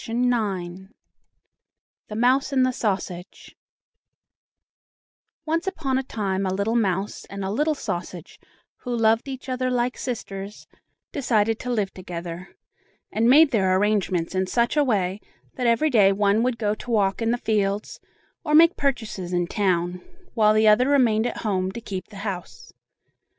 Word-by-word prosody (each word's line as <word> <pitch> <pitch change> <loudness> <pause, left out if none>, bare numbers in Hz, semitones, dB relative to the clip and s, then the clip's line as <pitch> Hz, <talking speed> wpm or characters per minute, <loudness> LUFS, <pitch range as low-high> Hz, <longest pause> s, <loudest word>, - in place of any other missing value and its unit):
THE 205 -7 -1 1.3
MOUSE 255 +5 +2
AND 260 -2 +3
THE 255 - +1
SAUSAGE 195 -5 -4 1.9
Once 330 +3 -1
upon 285 -9 -1
a - - -3
time 195 -6 -2
a - - -1
little 200 +4 -1
mouse 195 -3 -1
and 200 -1 -6
a 190 - -2
little 300 +8 +1
sausage, 175 - -6 0.4
who 245 -2 -4
loved 225 +2 +2
each 265 -1 -7
other 255 0 -1
like 250 0 -1
sisters, 205 -5 -6 0.5
decided 225 -5 +1
to 250 - -6
live 210 -5 -1
together, 175 0 -8 0.5
and 225 +2 +2
made 300 +3 +7
their 190 -5 +2
arrangements 190 -4 0
in 185 0 0
such 235 +7 +1
a 295 - +4
way 195 -6 0 0.3
that 250 -2 -1
every 235 +7 +2
day 205 -5 +5
one 200 +2 +2
would 245 -1 0
go 210 -2 0
to 230 +3 -10
walk 205 -2 +1
in 225 - +1
the 240 - +1
fields, 210 -3 -1 0.4
or 300 -2 +1
make 335 +2 +7
purchases 220 -10 -2
in 175 0 +1
town, 180 -2 -1 0.3
while 215 -2 +4
the 215 0 +4
other 245 +5 +5
remained 240 -5 +3
at 240 - -6
home 190 -3 -1
to 235 - -6
keep 195 -5 -6
the 215 - -15
house. 180 - -6
215 Hz, 155 wpm, -24 LUFS, 190-250 Hz, 1.9 s, made